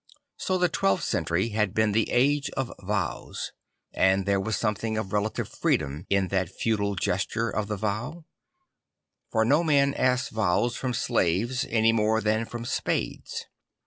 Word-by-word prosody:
So 185 - 0
the 180 0 +3
twelfth 95 - +1
century 90 +7 0
had 105 -2 0
been 110 -1 +3
the 110 +1 +1
age 140 +3 +2
of 135 -2 -2
vows; 100 -3 -3 0.4
and 95 0 +3
there 100 -1 +2
was 110 +2 -1
something 110 0 -1
of 100 -3 -3
relative 105 +1 -1
freedom 75 +2 -1
in 100 -2 +2
that 95 -3 0
feudal 100 -1 -1
gesture 100 +5 -1
of 105 0 -2
the 105 0 -3
vow; 110 - -3 1.1
for 110 -1 +2
no 145 +8 +4
man 140 -3 +3
asks 130 -1 +1
vows 110 +3 +1
from 125 -1 -2
slaves 110 +11 +1
any 115 0 +4
more 110 0 +2
than 110 +1 +1
from 120 +1 -6
spades. - - -2
110 Hz, 155 wpm, -27 LUFS, 100-120 Hz, 1.1 s, no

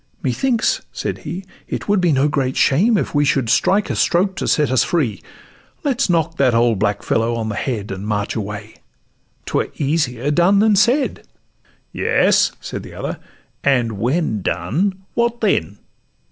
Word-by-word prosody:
'Methinks,' 270 - +1
said - - -4
he, 185 +2 -6 0.2
'it - - -5
would 205 -2 +2
be 175 -2 +3
no 140 0 +3
great 135 -3 -1
shame 205 - +3
If - - -2
we 145 -1 +3
should 135 -5 +1
strike 195 +11 +2
a - - -2
stroke 190 +2 +1
to - - -2
set 150 -4 +2
us 130 - +3
free; 130 - -1 0.6
Let 275 -4 0
's - - +2
knock 165 -1 +1
that 130 -4 +3
old 115 -3 +2
black 105 0 0
fellow 115 +1 0
on 110 -1 -3
the 105 - -3
head, 110 -4 -3
And 95 +2 -5
march 105 -1 -2
away—'twere 105 0 -6
easier 145 -3 0
done 175 +6 +4
than 210 +1 +4
said.' 245 +8 +2 0.7
'Yes,' - - +3
said - - -6
the - - -11
other, - - -5 0.4
'and 125 -5 +2
when 125 - 0
done, 175 - -1
what 235 0 0
then? 100 - 0
145 Hz, 165 wpm, -19 LUFS, -, 0.7 s, done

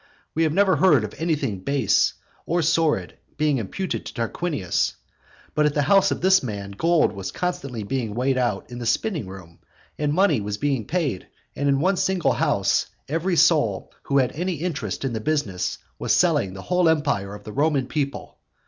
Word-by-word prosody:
We 160 - 0
have 160 -2 +3
never 190 +2 +3
heard 150 - +5
of 105 - -5
anything 145 - -1
base 135 +2 +2 0.3
or 170 0 +1
sordid 160 0 +1 0.2
being 150 -3 +2
imputed 180 - -3
to - - -8
Tarquinius. 115 - -1 0.6
But 150 0 +3
at 145 - -2
the 145 - +2
house 195 +5 +4
of - - -2
this 190 +1 +5
man 100 -5 -5
gold 165 +9 +2
was 95 -2 -6
constantly 140 - -3
being 115 -1 -3
weighed 130 +2 +1
out 125 0 -1
in 120 - -6
the 120 - -4
spinning 155 - 0
room, 90 -3 -11 0.4
and 150 -1 +1
money 160 - +3
was 100 0 -3
being 135 -4 -1
paid, 150 - -2 0.3
and 140 +1 0
in 135 -1 +3
one 185 +5 +2
single 190 -2 +1
house - - +1 0.2
every 165 +5 0
soul 150 - +3
who 140 - 0
had 130 -2 +3
any 180 +3 -2
interest 140 - -3
in 130 - -2
the 110 - -2
business 105 -11 -1 0.2
was - - +1
selling 95 -1 +2
the 95 - -8
whole 180 -2 +2
empire 140 -11 0
of 105 - -12
the 105 - -8
Roman 145 -2 +1
people. 140 +1 -4
140 Hz, 185 wpm, -23 LUFS, 110-165 Hz, 0.6 s, heard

